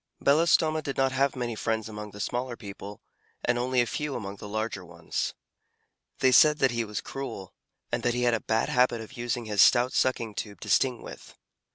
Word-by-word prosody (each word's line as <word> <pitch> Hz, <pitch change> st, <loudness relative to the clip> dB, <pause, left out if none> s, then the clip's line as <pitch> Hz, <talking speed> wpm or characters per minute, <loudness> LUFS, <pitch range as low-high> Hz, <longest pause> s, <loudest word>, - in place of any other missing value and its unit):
Belostoma 155 Hz, +1 st, +3 dB
did 140 Hz, -3 st, -5 dB
not 135 Hz, 0 st, +2 dB
have 135 Hz, +1 st, +1 dB
many 120 Hz, -2 st, -3 dB
friends 110 Hz, 0 st, -2 dB
among 105 Hz, -1 st, -7 dB
the 105 Hz, -, -12 dB
smaller 120 Hz, +3 st, -3 dB
people, 100 Hz, -1 st, -9 dB, 0.4 s
and 120 Hz, 0 st, +1 dB
only 125 Hz, 0 st, +2 dB
a -, -, +1 dB
few 150 Hz, +4 st, -3 dB
among 100 Hz, -3 st, -6 dB
the 105 Hz, -, -9 dB
larger 110 Hz, -2 st, -3 dB
ones. 90 Hz, 0 st, -4 dB, 0.9 s
They 130 Hz, -, +5 dB
said 150 Hz, +3 st, +6 dB
that 135 Hz, -4 st, +3 dB
he 120 Hz, -1 st, -1 dB
was 105 Hz, -2 st, -4 dB
cruel, 135 Hz, -9 st, -7 dB, 0.4 s
and -, -, -1 dB
that 120 Hz, 0 st, 0 dB
he 125 Hz, -, 0 dB
had 120 Hz, -1 st, +3 dB
a 115 Hz, -, +1 dB
bad 110 Hz, 0 st, 0 dB
habit 125 Hz, -2 st, +3 dB
of 115 Hz, +3 st, -9 dB
using 120 Hz, -1 st, -3 dB
his 105 Hz, -2 st, +2 dB
stout 125 Hz, +1 st, +5 dB
sucking 120 Hz, -4 st, 0 dB
tube 100 Hz, -2 st, -6 dB
to -, -, -7 dB
sting 125 Hz, -3 st, +2 dB
with. -, -, -11 dB
120 Hz, 205 wpm, -27 LUFS, 110-130 Hz, 0.9 s, said